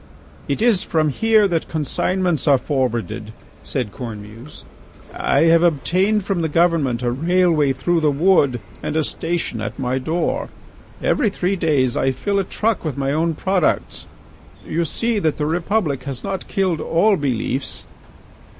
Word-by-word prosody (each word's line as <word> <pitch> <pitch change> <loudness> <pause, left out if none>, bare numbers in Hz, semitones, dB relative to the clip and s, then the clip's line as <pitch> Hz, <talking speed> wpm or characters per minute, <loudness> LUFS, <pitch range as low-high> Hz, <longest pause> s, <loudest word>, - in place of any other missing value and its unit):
"It 140 +10 -1
is 225 -6 +4
from 155 -2 +1
here 220 +6 +3
that 170 -4 -1
consignments 170 +2 -1
are 140 -2 +6
forwarded," 120 - -2 0.3
said 125 -7 -3
Cornemuse. 115 +2 -9 0.5
"I - - +1
have 165 0 +5
obtained 185 +6 +1
from 195 -4 -1
the 160 - -1
government 150 -7 +1
a 120 - +1
railway 165 0 +2
through 170 +6 0
the 155 -2 +2
Wood 145 -4 +3 0.2
and - - -3
a 160 - +2
station 165 -8 -3
at 110 - -5
my 130 -1 -1
door. 175 - -1 0.5
Every 240 -7 +2
three 190 0 -1
days 145 -8 +1
I 135 - +1
fill 200 +10 -1
a - - +1
truck 215 +3 -1
with 155 -4 -3
my 135 0 0
own 160 +2 0
products. 185 0 0 0.6
You 170 +2 -1
see 230 +7 -1
that 160 -6 0
the 150 - -1
Republic 165 -4 -1
has 135 -3 -5
not 195 -1 -4
killed 185 -5 0
all 200 +5 +3
beliefs." 135 -2 -3
160 Hz, 155 wpm, -20 LUFS, 135-185 Hz, 0.6 s, are